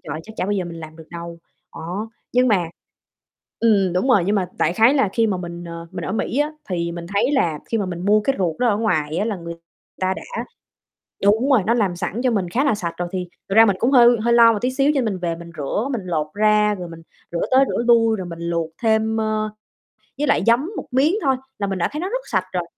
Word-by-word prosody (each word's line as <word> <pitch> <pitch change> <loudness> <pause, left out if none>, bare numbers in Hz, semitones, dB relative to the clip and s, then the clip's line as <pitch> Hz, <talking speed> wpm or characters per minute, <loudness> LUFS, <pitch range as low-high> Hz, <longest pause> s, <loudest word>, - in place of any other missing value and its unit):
trời 145 - -5
ơi, 155 - -5
chắc 220 - -11
chả - - -1
bao 205 - -1
giờ 195 -3 -1
mình 170 -1 -8
làm 155 0 -10
được 160 -1 -13
đâu", 170 0 -8 0.4
đó. 185 +7 -5 0.2
Nhưng 250 +1 +3
mà 195 -6 +3 1.0
ừm, 200 -5 +3
đúng 180 +9 0
rồi, 210 -8 +5
nhưng 205 - +1
mà 185 -3 -1
đại 155 - +2
khái 225 +8 +4
là 270 -8 +3
khi 230 -1 +2
mà 200 -3 0
mình, 175 -1 -7
ờ, 170 0 -8
mình - - -5
ở - - -3
Mỹ 230 +4 -2
á, 295 +1 +1 0.2
thì 170 -1 -1
mình 170 0 -7
thấy 245 +8 +2
là 170 - +1
khi 225 - +1
mà 200 - -1
mình 175 -1 -5
mua 210 +2 +4
cái 270 +6 0
ruột 170 -5 -1
đó 245 - +2
ở 205 - +2
ngoài 160 -8 0
á, 205 - +1
là 220 -2 -2
người 170 -1 -7 0.5
ta 185 0 +1
đã 485 - -6 0.8
đúng 220 +7 +3
rồi, 240 -8 +4
nó 230 - +3
làm 205 -7 +1
sẵn 180 +6 -3
cho 255 - +2
mình 190 -5 -1
khá 250 +10 +1
là 280 -6 +2
sạch 175 -5 -4
rồi. 175 0 -3
Thì 185 -1 -3 0.2
thực 195 - -1
ra 225 +1 +8
mình 200 - +2
cũng 245 - +2
hơi 240 -2 +6
hơi 235 +1 +2
lo 230 -1 +7
một 210 - -2
tí 250 +1 0
xíu, 275 +2 +2
cho 275 - +2
nên - - -1
mình 200 -4 -2
về 170 -2 -2
mình 170 0 -11
rửa, 205 - -2
mình 240 -5 -2
lột 160 -4 -1
ra 210 0 +3
rồi 180 -3 -7
mình 165 0 -11 0.3
rửa 170 - -2
tới 265 +1 +6
rửa - - -1
lui, 225 -2 +4
rồi 185 -2 -5
mình 170 -1 -8
luộc 170 -1 -2
thêm, 220 0 +2
ơ, 215 -1 -1 0.7
với 295 - 0
lại 280 - +2
giấm 250 +9 +3
một - - -5
miếng 275 +7 +3
thôi 265 -2 +3 0.2
là 200 - -1
mình 195 -1 -3
đã 170 - +1
thấy 300 - -4
nó 365 - -2
rất - - -3
sạch 190 -3 +1
rồi. 180 -1 -1
205 Hz, 270 wpm, -21 LUFS, 175-235 Hz, 1.0 s, ra